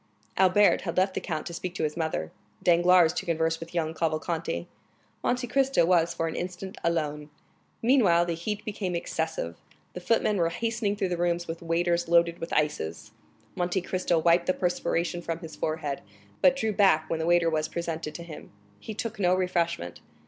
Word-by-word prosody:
Albert 190 +2 +4
had 170 -2 -4
left 190 +1 +3
the - - -3
count 155 -4 -3
to 170 - -6
speak 180 +1 -5
to 160 - -2
his 150 -1 -1
mother, 160 - -2 0.3
Danglars 175 -1 +5
to - - -3
converse 165 -1 0
with 165 +1 -9
young 160 -2 0
Cavalcanti; 160 - -2 0.6
Monte 250 0 0
Cristo 270 -4 +2
was 170 -1 +3
for 165 -1 -2
an 160 - -4
instant 185 +2 -5
alone. 150 -3 -1 0.5
Meanwhile 210 -9 +4
the 170 - -1
heat 205 +6 -4
became 200 -4 -3
excessive. 160 - -3 0.4
The - - -5
footmen 210 +2 +1
were 170 -2 +2
hastening 225 +1 -1
through 200 -3 -1
the 175 - -1
rooms 175 0 0
with 165 +1 -5
waiters 170 +1 0
loaded 170 0 +3
with 165 - -6
ices. 110 - -1 0.4
Monte 180 +1 0
Cristo 180 -1 0
wiped 170 +2 +3
the 185 - +2
perspiration 175 -1 -1
from 165 -1 -3
his 165 -2 -8
forehead, 155 -3 -3 0.4
but 270 - +6
drew 220 -5 -1
back 190 -6 +4
when 165 - -2
the 160 - -1
waiter 175 -1 +4
was 155 -1 0
presented 165 -2 -4
to 170 - -6
him; 165 -3 -10 0.3
he 220 - -7
took 220 -1 -4
no 180 -1 +3
refreshment. 170 - -1
170 Hz, 185 wpm, -27 LUFS, 165-185 Hz, 0.6 s, but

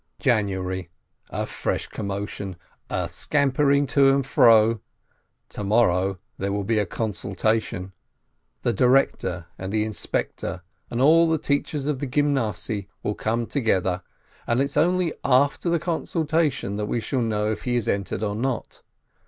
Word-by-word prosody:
January 95 - 0 0.2
— - - -37
a - - -2
fresh - - -2
commotion, 100 -1 -5 0.3
a - - -1
scampering 140 0 +2
to 135 0 +4
and 135 -1 +1
fro. 115 -5 +5 0.7
To 105 - -6
morrow 95 -3 +2 0.2
there 100 +1 -1
will 100 0 -1
be 110 +2 +1
a 105 - 0
consultation. 100 -1 -2 0.7
The 120 - +2
director 125 -9 +2
and 95 +1 -4
the 105 0 +1
inspector 110 -1 -3 0.3
and 120 - -3
all 165 +4 +6
the 160 - +2
teachers 145 -1 -1
of 145 -3 -1
the 140 - -3
Gymnasiye 120 -8 0 0.2
will 105 - 0
come 115 +3 -1
together, 95 -9 0 0.5
and 120 +1 +2
it's 140 +1 0
only 180 0 +2
after 140 +6 +3
the 170 - +3
consultation 160 - -1
that 105 0 -2
we 120 - 0
shall 125 +3 -1
know 105 -2 0
if 110 - -4
he 125 -1 0
is 120 -3 0
entered 100 +1 -1
or 105 -1 -1
not. 120 +2 -3
115 Hz, 150 wpm, -24 LUFS, 100-140 Hz, 0.7 s, all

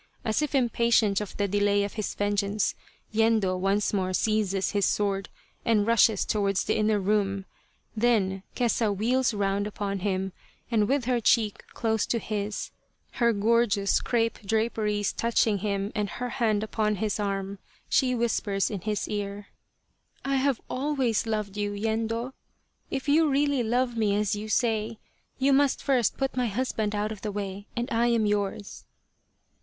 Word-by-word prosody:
As 220 +5 +1
if 300 -1 -1
impatient 235 -5 +3
of 210 - -7
the 205 - +1
delay 205 +1 +2
of 200 - -4
his 215 -2 -3
vengeance, 205 0 0 0.4
Yendo 220 -4 +2
once 195 +3 0
more 185 -2 0
seizes 200 -2 +1
his 205 -1 0
sword 195 -1 0 0.3
and 215 -3 +2
rushes 225 -2 +4
towards 200 -2 +1
the - - 0
inner 215 -1 +2
room. 195 -1 0 0.5
Then 210 -5 +1
Kesa 230 -3 +1
wheels 245 +5 +2
round 200 -1 0
upon 200 -1 -3
him, 190 -1 -2 0.4
and 215 -3 +3
with 275 -1 +1
her 250 -1 +1
cheek 220 -2 +2
close 220 -2 0
to 235 - 0
his, 210 -2 -3 0.5
her 235 0 +5
gorgeous 210 -1 +2
crepe 230 -2 0
draperies 210 -1 0
touching 225 -3 +1
him 200 0 -2
and 210 -2 -1
her 245 +8 -4
hand 215 -3 0
upon 215 -1 0
his 210 +1 -2
arm, 195 -1 -2 0.3
she 255 -1 +2
whispers 220 -4 0
in 200 -4 -4
his 210 +2 -2
ear: 205 0 -4 0.4
" - - -47
I 275 0 +1
have 265 -2 +1
always 260 -5 0
loved 210 -2 -2
you, 205 0 -1
Yendo. 225 +4 -2 0.6
If 270 +1 -4
you 310 +2 +4
really 285 -1 +2
love 240 +1 0
me 210 -3 +1
as 210 -1 +1
you 215 +1 -6
say, 220 -1 0 0.4
you 275 +1 +3
must 280 0 +2
first 255 -6 +2
put 270 -1 -1
my 250 -1 +1
husband 220 -2 -1
out 210 +1 -1
of 215 - -7
the 210 - -3
way, 200 0 -5
and 240 +1 -1
I 230 +1 +2
am 230 -2 +2
yours." 205 0 -2
215 Hz, 160 wpm, -27 LUFS, 200-235 Hz, 0.6 s, her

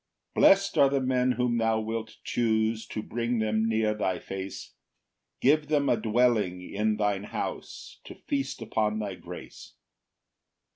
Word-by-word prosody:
3 - - 0
Bless'd 195 0 +5
are 140 - +7
the 140 0 +1
men 130 -1 +1
whom 125 -1 0
thou 115 -1 +2
wilt 110 0 -4
choose 110 -1 0
To 110 - -5
bring 120 +1 -2
them 110 0 +1
near 110 -1 +1
thy 95 -4 -1
face, 95 +2 -7 0.7
Give 150 +3 +3
them 145 -2 +2
a - - +4
dwelling 110 -5 +1
in 105 +1 0
thine 105 -1 0
house - - -6
To - - -9
feast 135 -4 -3
upon 110 -1 0
thy 105 -3 -3
grace. - - -11
110 Hz, 150 wpm, -28 LUFS, 105-125 Hz, 0.7 s, are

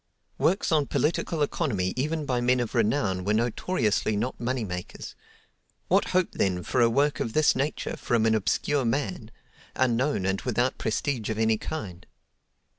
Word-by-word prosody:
Works 190 +3 +1
on 150 -3 +3
political 160 0 0
economy 105 - -1
even 150 +4 -1
by 125 -3 0
men 125 +1 +3
of 120 -2 -2
renown 105 -5 +1
were 105 +3 +1
notoriously 115 - 0
not 120 +5 -3
money 125 0 -1
makers. 90 -2 -7 0.8
What - - +4
hope 185 -1 +1
then 90 -2 0
for 125 - 0
a 115 - +5
work 145 +5 +1
of 115 - -2
this 155 -1 +4
nature 140 +4 -2
from 115 -2 0
an 110 - +3
obscure 130 +6 +1
man—unknown, 125 - -2
and 95 0 0
without 125 +1 0
prestige 115 0 -1
of 110 - -2
any 110 -1 +2
kind? 95 - -6
120 Hz, 155 wpm, -26 LUFS, 110-145 Hz, 0.8 s, a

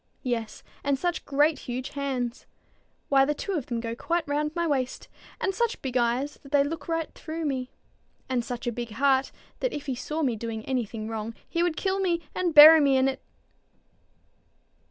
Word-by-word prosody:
"Yes, 235 -3 -3 0.2
and 280 -1 +1
such 350 +4 -2
great 295 +2 +2
huge 250 +2 -3
hands! 265 -4 -3 0.6
Why, 275 -1 +5
the 295 +2 0
two 400 - -4
of 310 -9 -2
them 235 -2 -2
go 230 0 -4
quite 335 +5 -1
round 295 +1 0
my 340 0 0
waist! 265 -5 -1 0.3
And 390 - 0
such 470 +3 0
big 260 -2 -5
eyes, 250 +4 0
that 275 - -15
they 285 -1 +5
look 290 0 -5
right 330 -1 -2
through 320 0 -5
me; 260 -3 -2 0.6
and 255 -2 0
such 245 0 -5
a 240 - 0
big 235 -1 -5
heart, 270 +2 +2 0.3
that - - -1
if 295 - -5
he 270 - -2
saw 300 +5 -3
me 250 -5 +1
doing 220 0 -5
any 255 -3 0
thing 215 +1 -6
wrong, 225 0 -4
he 335 - -1
would 345 -2 0
kill 385 0 0
me, 350 -3 +1
and 350 -3 -1
bury 310 +2 +11
me 275 -2 +4
in 260 0 +3
it." 270 - -2
275 Hz, 195 wpm, -27 LUFS, 245-315 Hz, 0.6 s, bury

